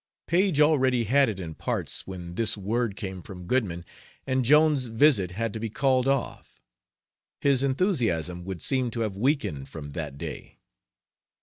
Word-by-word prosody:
Paige 180 -3 +2
already 130 -5 +3
had 135 +4 +3
it 100 -3 -5
in 85 -3 -6
parts - - -4
when 90 -2 -7
this 110 +2 0
word 110 +2 -1
came 95 -3 -6
from 90 0 -10
Goodman, 90 -7 -1 0.4
and 130 -1 +1
Jones's 150 0 +4
visit 115 - +3
had 110 +4 -3
to 110 - -4
be 115 0 -3
called 130 +2 +1
off. 135 -2 -2 0.8
His 140 -2 +3
enthusiasm 120 - 0
would 95 -2 -6
seem 130 -3 +1
to 115 0 -4
have 105 -4 -2
weakened 105 - -1
from 75 -2 -8
that 70 -3 -5
day. - - -8
115 Hz, 160 wpm, -26 LUFS, 90-135 Hz, 0.8 s, Jones's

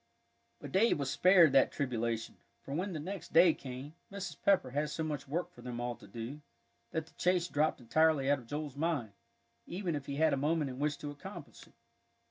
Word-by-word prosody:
But - - -8
Davie 215 +5 +4
was 140 -2 -2
spared 170 +1 +6
that 135 -1 +5
tribulation, 115 -4 -2 0.3
for 135 - -6
when 185 +6 -1
the 155 - -3
next 185 +3 -6
day 170 0 +7
came, 130 +3 -8 0.2
Mrs. 195 -3 -5
Pepper 190 -10 +3
had 145 +3 -1
so 160 - -3
much 150 -3 -4
work 175 +5 -2
for 180 - -15
them 120 -1 -5
all 120 0 -2
to 120 - -15
do, 115 +8 -7 0.5
that 160 -1 -2
the - - -21
chase 180 -1 +2
dropped 155 -2 +1
entirely 150 +3 +3
out 140 0 +3
of 120 - -15
Joel's 145 0 -4
mind, 145 -8 -1 0.6
even 180 -1 -2
if 145 -2 -5
he 140 - -3
had 155 +1 +3
a - - +1
moment 150 0 0
in 130 - -8
which 150 0 0
to 145 - -6
accomplish 145 - -10
it. - - -23
150 Hz, 210 wpm, -33 LUFS, 135-165 Hz, 0.6 s, day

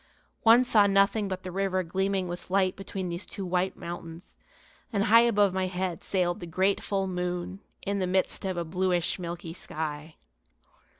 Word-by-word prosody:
One 235 +2 +7
saw 215 -5 +4
nothing 200 +1 +3
but 185 -1 -4
the 185 - -5
river 185 0 0
gleaming 190 +2 -1
with 175 +1 -7
light 185 -1 +2
between 195 -1 -5
these 170 +3 -5
two 195 - -5
white 180 +1 0
mountains; 170 0 -8 0.6
and 200 -3 +1
high 225 +2 +7
above 205 -5 +3
my 190 0 0
head 185 -1 -3
sailed 180 -2 0
the 175 - -7
great 190 +4 +1
full 195 -1 -1
moon, 180 0 -3 0.3
in 200 0 -1
the 185 - 0
midst 185 +1 0
of 190 -2 -2
a 170 - -1
bluish, 180 +1 0
milky 170 -1 -5
sky. 155 -2 -5
185 Hz, 175 wpm, -28 LUFS, 175-195 Hz, 0.6 s, One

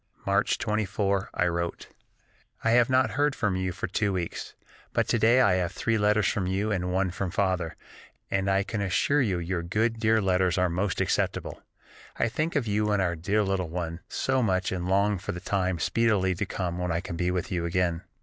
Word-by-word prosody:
March 100 +1 +2
24 100 -2 -1
I 90 - +2
wrote: 85 0 -3 0.7
"I 115 - +3
have 120 +1 +4
not 130 0 +3
heard 145 0 +1
from 105 -6 0
you 95 0 -1
for 90 - -4
two 100 +2 0
weeks, 90 -3 -4 0.4
but - - +1
to 115 - +2
day 115 +4 +5
I 100 -7 +4
have 90 -2 -1
three 115 - 0
letters 105 -1 +3
from 95 -3 0
you 100 +4 0
and 90 -2 -1
one 95 0 +1
from 95 0 -3
Father, 90 -5 -1 0.6
and 95 0 +1
I 95 0 +2
can 100 +1 -4
assure 100 +10 +2
you 100 -8 +1
your 85 0 -2
good, 110 +6 0
dear 110 0 +3
letters 95 -2 +1
are 90 0 +2
most 90 +2 -1
acceptable. - - -1 0.6
I - - +1
think 155 +8 -2
of 140 -5 +1
you 105 0 0
and 105 - +2
our 90 -2 +1
dear 100 +6 +1
little 95 -3 -1
one 85 -1 -4
so 130 -1 0
much 95 -4 +1
and 90 -1 -3
long 100 +1 +2
for 95 - -4
the 90 - -5
time 95 -1 -1
speedily 105 -1 +2
to 95 +3 -3
come 90 -3 -3
when 90 -1 -1
I 85 - 0
can 85 - -6
be 90 +1 0
with 90 -1 -2
you 85 -2 -1
again. 85 -1 0
95 Hz, 210 wpm, -27 LUFS, 90-105 Hz, 0.7 s, day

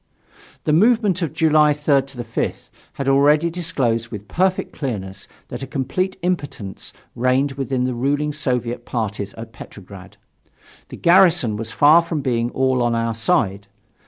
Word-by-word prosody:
The 150 - +1
movement 210 0 +3
of 165 - -1
July 155 -2 +3
3rd 145 -2 +2 0.2
5th 115 0 -4 0.2
had 140 - -5
already 145 +4 +4
disclosed 135 -10 -1
with 105 -2 -8
perfect 185 - 0
clearness 95 -8 -5 0.2
that 120 - -6
a 135 - -5
complete 140 +9 -2
impotence 145 - -4 0.2
reigned 130 +3 +1
within 135 -2 -2
the 125 0 -1
ruling 145 +4 -1
Soviet 125 -5 -2
parties 105 -4 -3
at 115 0 -10
Petrograd. 100 -3 -12 0.7
The - - -10
garrison 170 - +4
was 115 +1 -5
far 150 +8 +6
from 165 -3 -3
being 120 -3 0
all 130 0 0
on 120 -1 +1
our 115 0 -1
side. 105 - 0
135 Hz, 145 wpm, -20 LUFS, 115-155 Hz, 0.7 s, far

